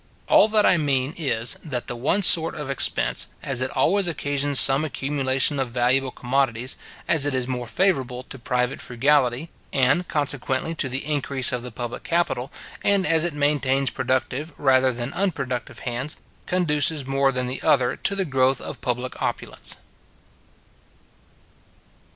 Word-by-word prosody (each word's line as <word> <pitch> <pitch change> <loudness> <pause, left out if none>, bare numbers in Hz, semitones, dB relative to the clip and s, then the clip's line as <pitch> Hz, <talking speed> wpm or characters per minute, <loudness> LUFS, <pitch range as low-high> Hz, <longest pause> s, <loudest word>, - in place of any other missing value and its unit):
All - - +6
that 215 -1 +3
I 180 - +5
mean 140 -2 0
is, 120 -7 +2
that 130 -6 -4
the 120 - -5
one 150 +12 0
sort 165 -2 +7
of 145 -2 -5
expense, 135 - 0 0.2
as 135 -3 0
it 130 - -1
always 195 +1 +2
occasions 145 -3 0
some 135 +2 +3
accumulation 135 -1 0
of 130 -2 -1
valuable 125 +2 +1
commodities, 125 -1 -1 0.3
as 155 -4 +3
it 145 - -1
is 125 -1 -1
more 125 -2 -4
favourable 130 - 0
to 130 - -11
private 125 +1 -1
frugality, 135 +3 +1 0.2
and, 140 +7 +2
consequently, 145 0 -1
to 140 -4 -1
the 130 +2 -2
increase 140 -3 0
of 125 -1 -2
the 125 0 -8
public 120 +1 -6
capital, 165 -7 -1 0.3
and 200 -2 +2
as 165 -2 +3
it 170 -3 -2
maintains 140 -2 +1
productive 130 +4 -2
rather 130 -2 +3
than 120 +2 -5
unproductive 135 - -3
hands, 125 +5 -4 0.3
conduces 155 -5 +2
more 135 0 +1
than 125 -1 -2
the 125 +1 -5
other 125 -3 +2
to 200 - 0
the 195 -1 -1
growth 135 -2 +1
of - - -7
public 125 +1 -4
opulence. - - -3
135 Hz, 155 wpm, -23 LUFS, 125-150 Hz, 0.3 s, sort